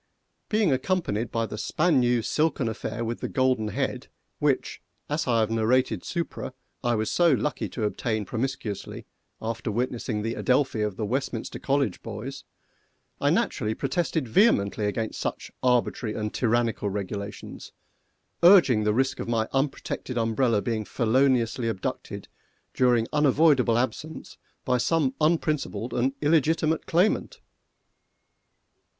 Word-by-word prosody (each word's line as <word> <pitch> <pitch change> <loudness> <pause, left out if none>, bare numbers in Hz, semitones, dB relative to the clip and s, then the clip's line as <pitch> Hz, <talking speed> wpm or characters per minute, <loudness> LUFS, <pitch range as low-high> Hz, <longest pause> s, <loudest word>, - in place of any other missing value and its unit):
Being 210 -6 +2
accompanied 130 - 0
by 115 0 0
the 105 0 -6
span 155 +3 +2
new 120 -2 +2
silken 150 -4 0
affair 110 +1 -4
with 115 +1 -3
the - - -4
golden 130 -5 +1
head, 105 - -3 0.3
which, - - 0 0.3
as 150 0 -2
I 115 -2 +3
have 110 0 0
narrated 115 -2 +1
supra, 150 -6 -4 0.3
I 120 -1 +2
was 110 0 -1
so 175 -1 +4
lucky 130 +3 -1
to 115 - -4
obtain 110 0 -1
promiscuously 115 -3 -4 0.3
after 115 0 -3
witnessing 115 -2 -2
the 115 +1 -1
Adelphi 130 -3 +1
of 105 -2 -1
the 110 - -2
Westminster 125 0 -3
college 135 -8 0
boys, 115 +5 -7 0.7
I - - +2
naturally 110 +1 0
protested 150 +1 -1
vehemently 110 - +3
against 110 +2 -3
such - - -4
arbitrary 120 -3 +1
and 105 -1 -3
tyrannical 115 -3 0
regulations, 100 +1 -6 0.7
urging 170 - +6
the 105 0 +2
risk 130 +2 +1
of - - -4
my 110 -2 +1
unprotected 135 -2 -2
umbrella 115 -1 +1
being 115 -2 -1
feloniously 120 0 +1
abducted 105 -5 -4 0.5
during 120 -3 +3
unavoidable 145 -4 +4
absence 150 +5 -4 0.3
by 125 -1 +2
some 145 -1 +1
unprincipled 150 -8 0
and 130 +2 +1
illegitimate 160 +1 +2
claimant. 180 +6 +1
120 Hz, 130 wpm, -26 LUFS, 110-140 Hz, 0.7 s, urging